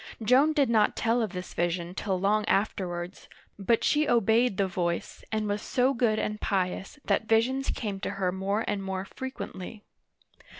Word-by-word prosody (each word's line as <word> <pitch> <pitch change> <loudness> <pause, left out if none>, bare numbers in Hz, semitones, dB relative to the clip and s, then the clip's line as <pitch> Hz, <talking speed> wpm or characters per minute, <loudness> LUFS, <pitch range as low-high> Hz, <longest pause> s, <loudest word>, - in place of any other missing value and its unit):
Joan 265 +8 +5
did 285 -3 +3
not 220 -3 +3
tell 235 +1 +1
of 220 - -1
this 180 -1 -7
vision 175 0 -1
till 190 -1 -2
long 210 +3 +2
afterwards, 180 -4 -2 0.3
but 225 +4 +2
she 300 0 +2
obeyed 230 -1 +3
the 200 - +2
voice, 175 -2 -3
and 215 -1 -1
was 205 0 -1
so 260 +1 +1
good 235 -4 +1
and 210 0 -2
pious 190 +3 -1
that 220 - +1
visions 255 +5 +2
came 205 -4 -3
to - - -3
her 185 -2 +1
more 195 +4 -1
and 205 -1 -1
more 190 0 -3
frequently. 210 -5 -7
210 Hz, 170 wpm, -28 LUFS, 190-235 Hz, 0.3 s, Joan